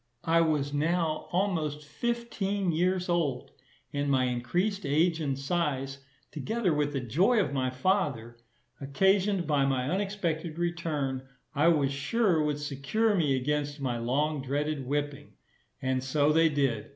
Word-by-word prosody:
I 165 +1 +4
was 150 -3 0
now 160 +1 0
almost 160 -6 -1
fifteen 205 -2 -2
years 180 +3 +1
old; 160 -8 -1 0.4
and 145 0 -1
my 130 -2 +3
increased 175 - -1
age 160 +4 +2
and 140 -3 -1
size, 135 -2 -2 0.3
together 195 - -1
with 145 -1 0
the 135 - 0
joy 175 - +2
of 190 - 0
my 130 -2 0
father, 130 - -1 0.4
occasioned 190 +6 +2
by 145 -3 +2
my 130 -2 0
unexpected 175 -3 -2
return, 160 -6 -2 0.3
I 145 +4 +3
was 145 -5 +3
sure 170 +5 +1
would 150 -1 0
secure 145 +10 0
me 155 -8 +2
against 145 +2 -1
my 125 -3 -2
long 140 +5 0
dreaded 140 0 -2
whipping; 145 +1 -3 0.5
and 130 -1 0
so 145 +3 +2
they 165 +1 +5
did. 135 -7 0
150 Hz, 140 wpm, -29 LUFS, 135-175 Hz, 0.5 s, they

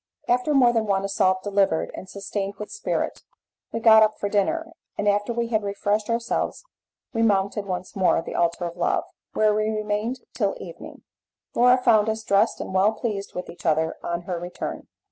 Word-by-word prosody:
After 250 +5 +2
more 245 -3 +5
than 225 -2 0
one 195 -1 +1
assault 190 -2 +1
delivered 195 -5 +1
and 190 - -9
sustained 200 0 -4
with 210 - -7
spirit, 430 - -2 0.5
we 230 - -2
got 220 -1 +7
up 215 0 +3
for 205 - -2
dinner, 325 +12 0 0.3
and 205 - -1
after 205 +2 +2
we 235 0 -1
had 220 -2 +1
refreshed 205 +1 -1
ourselves 230 - -1 0.5
we 225 - 0
mounted 200 -1 +1
once 180 -1 -4
more 190 -2 +3
the - - -7
altar 170 +1 0
of 170 0 -5
love, - - +1 0.3
where 215 -1 +3
we 215 +1 +1
remained 215 +3 -2
till - - 0
the - - -9
evening. - - -11 0.5
Laura 250 +1 +5
found 225 -4 +4
us 220 0 -2
dressed 205 +2 +2
and - - -5
well 195 +3 +4
pleased 210 -3 -4
with 180 - -4
each 175 - -12
other 160 0 +1
on 170 0 -3
her 180 -1 -3
return. 175 +1 -6
210 Hz, 190 wpm, -24 LUFS, 195-225 Hz, 0.5 s, got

